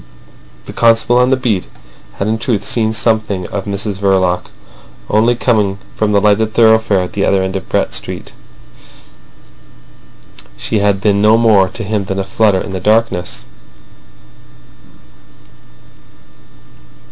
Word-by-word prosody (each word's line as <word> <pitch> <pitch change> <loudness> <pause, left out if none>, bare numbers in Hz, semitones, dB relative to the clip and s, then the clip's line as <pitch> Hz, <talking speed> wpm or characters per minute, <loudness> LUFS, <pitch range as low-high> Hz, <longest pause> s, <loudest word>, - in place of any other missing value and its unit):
The - - -9
constable 115 +1 +3
on 125 0 +3
the 130 - +2
beat 110 -8 -1 0.5
had 100 - -3
in 110 +1 -1
truth 110 -4 -2
seen 110 -2 0
something 110 -4 -1
of 100 -2 -5
Mrs 100 0 -4
Verloc; 95 -2 0 0.6
only 115 +3 +3
coming 105 -5 0 0.2
from 110 -1 0
the 100 - +3
lighted 105 +2 +1
thoroughfare 110 -4 +3
at 90 - -6
the 100 - -1
other 95 -1 +2
end 95 0 -4
of 95 - -6
Brett - - -1
Street, - - -6 2.3
she 105 - -2
had 100 -1 +1
been 100 -1 +2
no 110 +1 +5
more 105 -5 +3
to 110 - -7
him 105 -1 -2
than 95 0 -4
a 95 - -1
flutter 105 -1 +1
in 100 - -7
the 95 - -4
darkness. 105 -3 0
105 Hz, 135 wpm, -14 LUFS, 95-110 Hz, 2.3 s, no